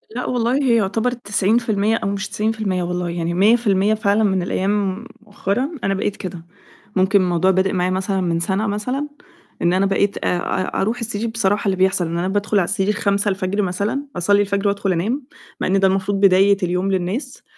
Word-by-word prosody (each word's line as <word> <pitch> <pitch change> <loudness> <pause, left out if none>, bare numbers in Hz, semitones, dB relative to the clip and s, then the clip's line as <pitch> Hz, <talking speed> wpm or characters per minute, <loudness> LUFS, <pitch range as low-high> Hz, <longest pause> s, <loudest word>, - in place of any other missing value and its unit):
لأ 250 - -3
والله، 245 0 0
هي 240 -3 +3
يُعتبر 220 +4 0
90% 215 -1 +1
أو 200 - -2
مش 200 0 -3
90% 210 -4 -1
والله، 180 0 -2
يعني 170 0 -2
100% 205 0 +3
فعلًا 215 0 +1
من 190 -3 +1
الأيام 195 +3 -1 0.2
مؤخرًا 210 +5 -2
أنا 195 - +1
بقيت 195 +1 -2
كده. 175 -3 -7 0.5
ممكن 190 +1 +3
الموضوع 180 +1 +2
بادئ 190 +1 +1
معايا 180 0 0
مثلًا 190 +1 -1
من 170 -2 0
سنة 195 +5 -1
مثلًا، 250 +8 -2 0.5
إن 175 +1 +2
أنا 190 +1 +2
بقيت 200 +1 +1
آآ، 180 - 0
آآ، 185 +1 -2
أرُوح 225 +5 -1
السرير 230 0 -3
بصراحة 210 -2 0
اللي 190 - +2
بيحصل 190 -2 +2
إن 170 +1 -3
أنا 180 +2 -1
بادخل 205 +1 0
على 175 - +1
السرير 205 +1 0
05:00 200 -1 0
مثلًا، 200 +9 -2
أصلّي 200 +4 +3
الفجر 200 0 0
وأدخل 200 -1 0
أنام، 225 - -1 0.4
مع - - 0
إن 195 +1 +2
ده 195 - +4
المفروض 195 +1 0
بداية 195 0 +5
اليوم 180 +2 0
للناس، 190 +8 -3
200 Hz, 185 wpm, -20 LUFS, 185-215 Hz, 0.5 s, بداية